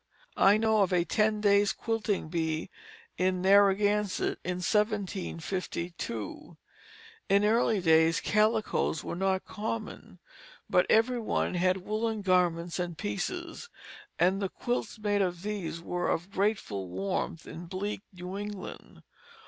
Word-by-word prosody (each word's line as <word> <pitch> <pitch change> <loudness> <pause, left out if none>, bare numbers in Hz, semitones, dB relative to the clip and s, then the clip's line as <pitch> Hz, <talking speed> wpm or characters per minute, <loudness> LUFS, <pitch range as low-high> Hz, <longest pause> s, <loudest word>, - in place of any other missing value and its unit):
I 200 +2 +6
know 220 -1 +3
of 190 - +2
a 175 -1 +2
ten 215 +2 +1
days' 205 0 +4
quilting 225 -5 -2
bee 160 -1 -2 0.5
in 185 0 +2
Narragansett 200 +1 +3
in 180 0 -2
1752. 180 - -3 0.7
In 200 +1 +4
early 220 -1 +3
days 160 -1 +4
calicoes 215 -6 +1
were - - -4
not 190 +1 0
common, 215 +1 -5 0.5
but - - +3
every 240 +3 +3
one 220 - -1
had 185 +1 +1
woollen 215 0 -1
garments 175 -2 +1
and 175 -2 -3
pieces, 340 - -4 0.5
and 190 +3 +2
the 195 - -1
quilts 240 +2 -3
made 205 -1 +1
of 180 -2 -1
these 200 -6 -3
were 175 +1 -2
of 175 +4 -2
grateful 190 - -1
warmth 95 - -3
in 170 +1 -8
bleak 195 +3 -4
New 180 +1 -6
England. 205 -2 -8
195 Hz, 125 wpm, -29 LUFS, 175-210 Hz, 0.7 s, I